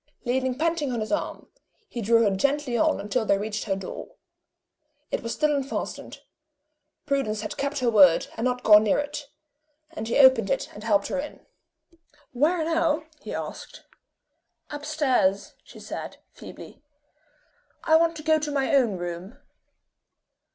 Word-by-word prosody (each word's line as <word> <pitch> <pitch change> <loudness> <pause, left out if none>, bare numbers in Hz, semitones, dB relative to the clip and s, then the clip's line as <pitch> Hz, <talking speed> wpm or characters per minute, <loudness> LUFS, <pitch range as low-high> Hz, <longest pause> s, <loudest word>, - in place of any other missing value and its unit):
Leaning 255 +1 0
panting 320 -3 0
on 240 - -2
his 215 - -4
arm, 310 - -3 0.4
he 235 - -6
drew 230 +2 +4
her 200 -3 +2
gently 280 +3 0
on 230 - +2
until 210 +4 -1
they 200 -2 +2
reached 210 +1 -4
her 195 -3 0
door. 190 -1 -8 1.0
It - - -1
was 230 - -5
still 300 +2 +1
unfastened. 275 0 -5 0.8
Prudence 270 -8 -1
had 210 -1 -5
kept 280 +1 -2
her 245 - +2
word, 190 -6 +6
and 225 - -4
not 250 0 -1
gone 210 0 +7
near 210 - +2
it; 290 0 -4 0.6
and 225 -9 -6
he 235 - 0
opened 260 -7 +6
it, - - -1
and 210 - -10
helped 205 -3 +2
her - - -2
in. 300 - -8 0.9
"Where 315 +7 +1
now?" 325 -1 +1 0.2
he - - -8
asked. - - -7 0.9
"Up 290 0 -6
stairs," 260 -11 +1
she - - -14
said, - - -7
feebly. - - -12 1.0
"I 320 - +4
want 330 0 +3
to 305 - -8
go 315 0 +3
to 300 -1 -3
my 275 -1 0
own 240 -8 +3
room." 175 +4 -6
255 Hz, 160 wpm, -25 LUFS, 215-295 Hz, 1.0 s, gone